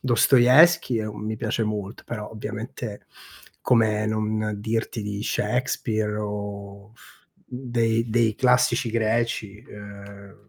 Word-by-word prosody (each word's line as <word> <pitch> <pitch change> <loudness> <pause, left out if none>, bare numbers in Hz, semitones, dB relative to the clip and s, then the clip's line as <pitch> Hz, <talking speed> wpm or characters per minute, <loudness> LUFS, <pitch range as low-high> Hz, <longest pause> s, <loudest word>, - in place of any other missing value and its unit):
Dostoevskij 130 +3 +5
è 110 - -4
un 105 0 -7
mi 110 +1 -2
piace 115 +1 -1
molt 105 0 -5
però 105 -3 -6
ovviamente 110 0 -7 0.5
come 110 -3 +2
non 110 0 -1
dirti 110 +1 -2
di 105 0 -4
Shakespeare 110 -1 -1
o 100 0 -6 0.5
dei 120 -2 -1
dei 115 -1 +2
classici 125 -2 +3
greci, 110 -1 -1
ehm, 100 0 -12
110 Hz, 110 wpm, -24 LUFS, 105-120 Hz, 0.5 s, Dostoevskij